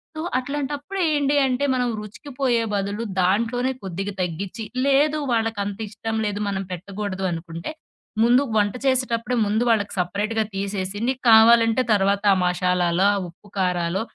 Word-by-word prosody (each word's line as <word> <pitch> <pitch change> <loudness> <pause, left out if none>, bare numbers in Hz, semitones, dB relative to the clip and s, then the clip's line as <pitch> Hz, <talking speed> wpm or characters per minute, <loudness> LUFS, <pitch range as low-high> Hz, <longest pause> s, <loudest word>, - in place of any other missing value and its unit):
so 315 - -4 0.2
అట్లాంటప్పుడు 290 +7 -4
ఏంటి 290 -1 +1
అంటే, 255 +2 -1
మనం 250 -1 0
రుచికిపోయే 240 +2 -2
బదులు, 200 +2 -2 0.2
దాంట్లోనే 230 +7 +1
కొద్దిగా 195 +2 -4
తగ్గిచ్చి 180 +5 -4 0.2
లేదు 290 +2 +3
వాళ్ళకంతిష్టం 220 -1 -2
లేదు, 205 0 -2
మనం 195 -1 -2
పెట్టకూడదు 195 +1 -5
అనుకుంటే, 170 - -6 0.5
ముందు 245 +4 +5
వంట 205 -1 +2
చేసేటప్పుడే 250 -2 +1
ముందు 215 +3 +1
వాళ్ళకి 210 -3 +1
సపరేట్‌గా 210 +5 -1
తీసేసి, 195 0 -3
నీకు 260 -1 -1
కావాలంటే 230 +2 +6
తర్వాత 200 0 +1
ఆ - - +1
మషాలాలో, 180 0 +1
ఆ - - -1
ఉప్పు 180 +4 -19
కారాలో 180 0 0
210 Hz, 130 wpm, -23 LUFS, 195-245 Hz, 0.5 s, కావాలంటే